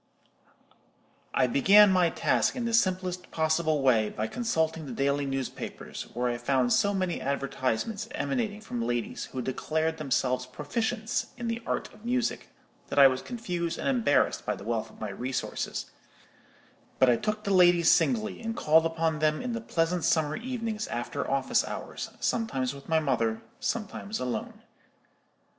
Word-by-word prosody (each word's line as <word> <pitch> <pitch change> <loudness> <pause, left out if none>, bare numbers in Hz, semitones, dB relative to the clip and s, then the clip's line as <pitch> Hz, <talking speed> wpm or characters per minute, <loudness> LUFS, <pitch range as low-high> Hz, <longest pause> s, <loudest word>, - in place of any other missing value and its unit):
"I - - +3
began 195 - +6
my 180 -2 +4
task - - +1
in 245 -2 -2
the 230 - -1
simplest 185 -4 +1
possible 160 -2 +1
way 115 -5 +4
by 110 - -3
consulting 160 - -1
the - - -6
daily 140 +2 0
newspapers, 135 -1 -5
where 125 +1 0
I 120 0 -1
found 125 0 +2
so 200 - +3
many 185 -3 -1
advertisements 140 - -2
emanating 225 -5 -2
from 120 - -4
ladies 120 0 -2
who 130 -1 -5
declared 160 +5 -1
themselves 130 -3 0
proficients 220 - -2
in 240 -2 -3
the 230 0 -2
art - - -2
of 210 - -17
music, 245 0 -1 0.4
that - - -5
I 140 - +9
was 130 -1 +4
confused 175 -8 -3
and - - -3
embarrassed 240 - +2
by 105 - -1
the 100 - -10
wealth 115 0 -2
of - - -17
my 110 - -4
resources: 125 +6 -4 1.1
but 130 - +5
I 120 - +5
took 210 - -2
the 200 - 0
ladies 175 -2 +6
singly, 215 -4 +1
and 225 0 -4
called 160 +2 +4
upon 165 -1 -1
them 155 0 +2
in 250 - -3
the 230 - -3
pleasant 170 -4 0
summer 155 -2 +2
evenings 230 -3 -3
after - - -3
office - - +2
hours, - - -6
sometimes 135 - -1
with 140 +2 -12
my 160 0 +4
mother, 115 -7 0 0.2
sometimes 215 -1 -3
alone. 120 -4 -4
160 Hz, 160 wpm, -28 LUFS, 130-210 Hz, 1.1 s, I